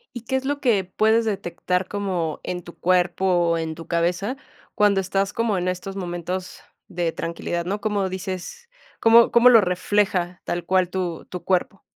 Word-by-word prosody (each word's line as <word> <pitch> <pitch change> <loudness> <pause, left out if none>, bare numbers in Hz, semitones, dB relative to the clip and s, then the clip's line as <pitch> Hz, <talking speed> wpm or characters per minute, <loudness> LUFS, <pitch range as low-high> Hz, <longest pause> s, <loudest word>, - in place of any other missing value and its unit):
¿Y 240 - -5
qué 265 - -1
es 265 - 0
lo 285 +1 -2
que 220 -8 +2
puedes 220 +5 +2
detectar 180 -3 -2
como 185 -6 -2
en 180 -1 -4
tu 170 - -13
cuerpo 180 +1 +1 0.3
o 165 - +1
en 160 -1 -3
tu 165 - -10
cabeza? 180 +8 0 0.4
Cuando 205 -2 +3
estás 195 +1 -1
como 225 -4 0
en 180 +1 -1
estos 185 +2 -5
momentos 180 0 -5 0.3
de 170 -2 -2
tranquilidad, 170 +1 -3
¿no?, 200 +3 -2
cómo 205 -3 -1
dices, 190 - -6 0.3
¿cómo 230 +1 +6
cómo 235 +1 +6
lo 230 -3 +7
refleja 180 -1 0
tal 175 -1 -3
cual 185 -1 +2
tu 180 -3 -3
tu 180 - -7
cuerpo? 190 +1 0
185 Hz, 175 wpm, -23 LUFS, 175-210 Hz, 0.4 s, lo